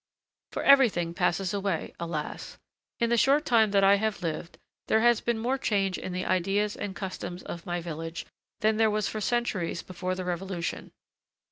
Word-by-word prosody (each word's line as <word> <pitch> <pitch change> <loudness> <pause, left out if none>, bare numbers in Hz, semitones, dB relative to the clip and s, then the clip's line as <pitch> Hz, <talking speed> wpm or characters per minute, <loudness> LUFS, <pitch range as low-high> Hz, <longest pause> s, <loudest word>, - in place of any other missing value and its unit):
For - - -3
everything 225 -12 +5
passes 185 +3 0
away, 195 -4 -2
alas! 165 -3 -5 0.4
In 235 -1 +1
the 235 - +4
short 280 +6 +4
time 230 -6 +4
that 200 -1 +3
I 200 +1 +6
have 215 -2 -2
lived, 165 +1 -4 0.3
there 220 - +3
has 240 -1 +4
been 235 -1 0
more 250 +4 -1
change 195 -6 +1
in 185 - -5
the 180 +1 -3
ideas 195 +3 +1
and 195 -1 -5
customs 185 -2 -6
of 170 +2 -7
my 175 0 -2
village 165 0 -5 0.4
than 215 0 +3
there 220 -1 +4
was 210 0 0
for 215 - -4
centuries 210 -7 -1
before 185 0 -4
the 185 0 -5
Revolution. 180 0 -4
195 Hz, 175 wpm, -28 LUFS, 175-220 Hz, 0.4 s, I